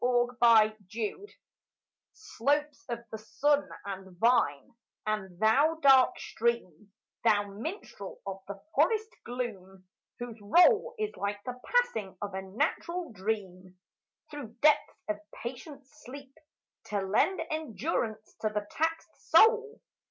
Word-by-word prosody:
87 245 Hz, 0 st, +2 dB
PASTORAL 220 Hz, -, +3 dB, 0.9 s
SLOPES 290 Hz, -, -1 dB
of 235 Hz, 0 st, -4 dB
the 220 Hz, -, -5 dB
sun 290 Hz, +6 st, +1 dB, 0.2 s
and 190 Hz, -2 st, -7 dB
vine, 180 Hz, -, +2 dB, 0.3 s
and 200 Hz, -4 st, -3 dB
thou 275 Hz, +9 st, +4 dB
dark 270 Hz, -4 st, +6 dB
stream, 210 Hz, -5 st, -2 dB, 0.3 s
Thou 205 Hz, -1 st, +4 dB
minstrel 215 Hz, -, -7 dB
of 195 Hz, -1 st, -5 dB
the 200 Hz, 0 st, -7 dB
forest 440 Hz, -1 st, +2 dB
gloom, 190 Hz, -7 st, -6 dB, 0.3 s
whose 240 Hz, -2 st, -7 dB
roll 425 Hz, -, +4 dB
Is 430 Hz, 0 st, -3 dB
like 205 Hz, 0 st, -3 dB
the 250 Hz, 0 st, -6 dB
passing 225 Hz, -, 0 dB
of 205 Hz, -2 st, -5 dB
a 190 Hz, -, -3 dB
natural 310 Hz, -, -2 dB
dream 185 Hz, -3 st, -4 dB, 0.5 s
Through 270 Hz, -7 st, -8 dB
depths 305 Hz, -1 st, +3 dB
of 210 Hz, -1 st, -2 dB, 0.2 s
patient 270 Hz, +4 st, -7 dB
sleep 275 Hz, -1 st, -12 dB, 0.5 s
To 205 Hz, -1 st, -2 dB
lend 210 Hz, -, +2 dB
endurance 230 Hz, -, -3 dB
to 215 Hz, -, +1 dB
the 210 Hz, -1 st, -3 dB
taxed 325 Hz, +1 st, -3 dB
soul. 450 Hz, 0 st, +5 dB
235 Hz, 120 wpm, -30 LUFS, 205-295 Hz, 0.9 s, dark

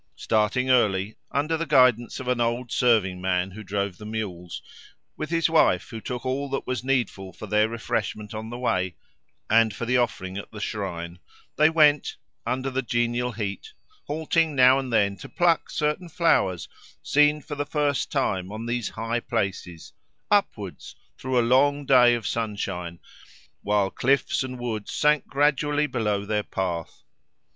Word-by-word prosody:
Starting 110 Hz, +4 st, +1 dB
early, 105 Hz, -4 st, +2 dB, 0.2 s
under 150 Hz, +4 st, 0 dB
the 165 Hz, 0 st, -3 dB
guidance 125 Hz, -5 st, +3 dB
of 130 Hz, -, -7 dB
an 125 Hz, -1 st, +1 dB
old 120 Hz, +1 st, -1 dB
serving 105 Hz, -7 st, +2 dB
man 90 Hz, 0 st, 0 dB
who 110 Hz, +4 st, -9 dB
drove 100 Hz, -1 st, -3 dB
the -, -, -10 dB
mules, 95 Hz, -6 st, -5 dB, 0.5 s
with 155 Hz, -, -5 dB
his 165 Hz, -1 st, +2 dB
wife 155 Hz, -, +2 dB
who 115 Hz, -1 st, -6 dB
took 125 Hz, +2 st, -5 dB
all 135 Hz, +2 st, -2 dB
that 135 Hz, -, -3 dB
was 125 Hz, -2 st, -3 dB
needful 120 Hz, -8 st, -1 dB
for 110 Hz, -, -9 dB
their 105 Hz, +1 st, +2 dB
refreshment 110 Hz, -2 st, -3 dB
on 110 Hz, +1 st, -6 dB
the 120 Hz, -, -6 dB
way 95 Hz, -8 st, -1 dB, 0.5 s
and 110 Hz, -1 st, +3 dB
for 115 Hz, -, -4 dB
the 125 Hz, +2 st, +2 dB
offering 100 Hz, -6 st, -1 dB
at -, -, -9 dB
the 105 Hz, -, -10 dB
shrine, 90 Hz, -5 st, -4 dB, 0.4 s
they 155 Hz, +2 st, +5 dB
went, 150 Hz, -2 st, +3 dB, 0.3 s
under 130 Hz, +1 st, -1 dB
the 130 Hz, +1 st, -1 dB
genial 120 Hz, 0 st, -1 dB
heat, 105 Hz, -, -5 dB, 0.3 s
halting 160 Hz, 0 st, 0 dB
now 130 Hz, 0 st, +6 dB
and 130 Hz, -2 st, -5 dB
then 100 Hz, -3 st, +2 dB
to 95 Hz, -, -11 dB
pluck 175 Hz, -3 st, +2 dB
certain 150 Hz, +4 st, -1 dB
flowers 95 Hz, -, +1 dB, 0.4 s
seen 150 Hz, +1 st, +3 dB
for 150 Hz, +1 st, -8 dB
the 145 Hz, 0 st, -2 dB
first 145 Hz, -3 st, -1 dB
time 95 Hz, -1 st, -1 dB
on 110 Hz, +2 st, -6 dB
these 120 Hz, -1 st, -2 dB
high 115 Hz, +2 st, -2 dB
places, 95 Hz, -8 st, -4 dB, 0.4 s
upwards, 110 Hz, -, -1 dB, 0.2 s
through 130 Hz, 0 st, -2 dB
a 120 Hz, -, +2 dB
long 140 Hz, +4 st, +3 dB
day 125 Hz, -3 st, +6 dB
of 115 Hz, -4 st, -5 dB
sunshine, 95 Hz, -7 st, -3 dB, 0.6 s
while 100 Hz, -1 st, +1 dB
cliffs 135 Hz, +2 st, +1 dB
and 130 Hz, -1 st, -4 dB
woods 115 Hz, -4 st, -4 dB
sank 150 Hz, 0 st, +2 dB
gradually 145 Hz, +1 st, +1 dB
below 105 Hz, -7 st, -1 dB
their 105 Hz, 0 st, 0 dB
path. 90 Hz, -5 st, -4 dB
120 Hz, 165 wpm, -25 LUFS, 100-135 Hz, 0.6 s, now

